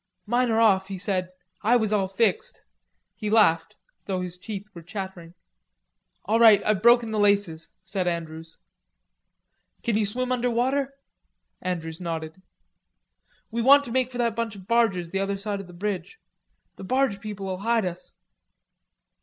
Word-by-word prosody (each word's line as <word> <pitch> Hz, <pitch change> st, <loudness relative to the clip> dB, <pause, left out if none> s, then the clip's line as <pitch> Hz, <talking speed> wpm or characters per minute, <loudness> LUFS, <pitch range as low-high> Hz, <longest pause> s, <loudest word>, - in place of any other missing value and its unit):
"Mine 240 Hz, +3 st, +1 dB
are 225 Hz, 0 st, +2 dB
off," 195 Hz, -4 st, +4 dB
he 195 Hz, -1 st, -5 dB
said. 185 Hz, -1 st, -1 dB, 0.3 s
"I 225 Hz, +4 st, +3 dB
was 220 Hz, -3 st, +2 dB
all 195 Hz, -2 st, +1 dB
fixed." 195 Hz, 0 st, 0 dB, 0.5 s
He 210 Hz, -, -4 dB
laughed, 165 Hz, -7 st, +3 dB, 0.3 s
though 190 Hz, -2 st, -1 dB
his 180 Hz, -1 st, -4 dB
teeth 200 Hz, +2 st, -7 dB
were 170 Hz, -, -10 dB
chattering. 180 Hz, -2 st, -7 dB, 0.9 s
"All 220 Hz, +3 st, +2 dB
right. 220 Hz, -3 st, +8 dB
I've 210 Hz, -3 st, +2 dB
broken 235 Hz, 0 st, +5 dB
the 215 Hz, -, -1 dB
laces," 200 Hz, -6 st, +1 dB
said 190 Hz, -1 st, -2 dB
Andrews. 160 Hz, -1 st, -5 dB, 1.3 s
"Can 230 Hz, -, 0 dB
you 210 Hz, -1 st, +2 dB
swim 255 Hz, +4 st, -2 dB
under 250 Hz, -1 st, +1 dB
water?" 265 Hz, +4 st, 0 dB, 0.7 s
Andrews 165 Hz, -2 st, -4 dB
nodded. 165 Hz, 0 st, -5 dB, 1.1 s
"We 235 Hz, +1 st, -1 dB
want 280 Hz, +4 st, +7 dB
to 240 Hz, -, -8 dB
make 255 Hz, 0 st, 0 dB
for 245 Hz, -, -7 dB
that 235 Hz, -2 st, 0 dB
bunch 230 Hz, -2 st, -3 dB
of 190 Hz, -2 st, -12 dB
barges 200 Hz, -8 st, +1 dB
the 195 Hz, -, -1 dB
other 195 Hz, 0 st, -1 dB
side 200 Hz, 0 st, -3 dB
of 195 Hz, -, -12 dB
the -, -, -12 dB
bridge. 185 Hz, -, -4 dB, 0.6 s
The -, -, -9 dB
barge 250 Hz, -2 st, 0 dB
people'll 195 Hz, -3 st, -5 dB
hide 225 Hz, +1 st, +1 dB
us." 180 Hz, 0 st, -6 dB
200 Hz, 160 wpm, -25 LUFS, 180-230 Hz, 1.3 s, right